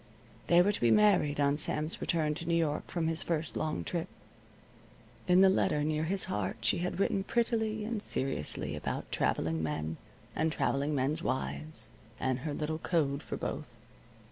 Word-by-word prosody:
They 175 +1 +6
were 205 - +3
to - - -4
be 120 - +4
married 180 - +4
on 140 0 +3
Sam's 155 +1 0
return 155 -3 +1
to 165 - -6
New 170 - +2
York 155 -3 0
from 170 -2 -2
his 165 0 0
first 165 -1 -2
long 155 - -1
trip. - - -3 1.2
In 180 +1 +6
the 195 - +8
letter 150 -5 +2
near 155 +1 0
his 190 +3 +1
heart 105 0 -2
she 110 - +2
had 180 +1 -2
written 195 0 +1
prettily 220 -1 0
and 220 -1 -2
seriously 135 - -2
about - - -4
traveling 80 0 0
men, 80 +1 -2 0.4
and 160 - +1
traveling 140 0 0
men's 140 +4 +1
wives, 135 -4 -2 0.3
and 130 -1 0
her 150 +3 -3
little 155 +1 -2
code 145 -5 0
for - - -5
both. 125 -6 -5
155 Hz, 170 wpm, -31 LUFS, 135-175 Hz, 1.2 s, the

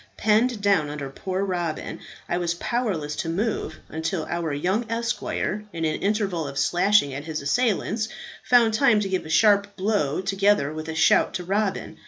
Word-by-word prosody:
Penned 220 +1 +2
down 195 -7 +3
under 145 -2 -5
poor 190 +6 -3
Robin, 175 -4 -3 0.3
I 175 - -1
was 170 -1 -1
powerless 175 -9 -2
to 165 - -2
move 190 -3 -2
until 160 +1 -3
our 170 -2 -2
young 190 +10 -1
esquire, 230 -2 -2
in 165 -2 -3
an 155 0 -1
interval 195 -6 0
of 140 0 -7
slashing 175 -1 +3
at 140 +2 -6
his 155 -3 -4
assailants, 220 - 0 0.3
found 235 -3 +4
time 220 -2 +4
to 195 - -2
give 185 -4 -2
a - - -10
sharp 205 +2 +3
blow 190 -7 0
together 195 -5 +1
with 155 +1 -6
a 160 - -4
shout 165 - +3
to 180 - -3
Robin. 195 +2 -2
190 Hz, 175 wpm, -24 LUFS, 160-210 Hz, 0.3 s, found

